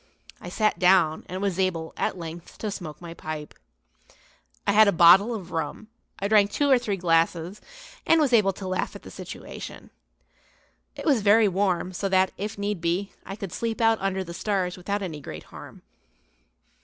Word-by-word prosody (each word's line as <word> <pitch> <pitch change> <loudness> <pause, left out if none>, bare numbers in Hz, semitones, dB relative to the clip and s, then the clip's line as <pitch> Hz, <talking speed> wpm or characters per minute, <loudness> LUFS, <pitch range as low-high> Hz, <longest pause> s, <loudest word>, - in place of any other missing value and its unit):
I - - -7
sat 215 -1 0
down 180 -4 +3
and 185 +3 -4
was 195 -2 -1
able, 170 -4 -1
at - - -2
length, 165 0 -9
to 215 - -4
smoke 165 -6 -7
my 170 -1 -8
pipe. 155 -2 -7 1.1
I - - +3
had 215 +1 +6
a - - +5
bottle 180 +6 +6
of 185 -5 -8
rum; 160 +6 -4 0.3
I 200 - -2
drank 205 -1 +4
two 285 +4 +1
or 260 - +6
three 205 -5 -2
glasses, 170 +2 +1 0.4
and 330 - +4
was 285 -5 +2
able 210 -4 +5
to 190 0 -7
laugh 185 0 -2
at - - -10
the - - -11
situation. - - -9 1.0
It - - -8
was 275 -8 +3
very 210 +2 +5
warm; 185 -1 0
so 195 +2 -2
that, 190 0 +3
if 205 +1 -5
need 200 -3 -3
be, 175 +4 -1 0.2
I 195 - -5
could 195 -4 -7
sleep 230 -1 -3
out 225 -1 +3
under 190 -1 -1
the 170 -1 -8
stars 185 -1 -1
without 200 +3 -3
any 160 -5 -6
great 80 - -8
harm. - - -13
190 Hz, 185 wpm, -25 LUFS, 170-205 Hz, 1.1 s, had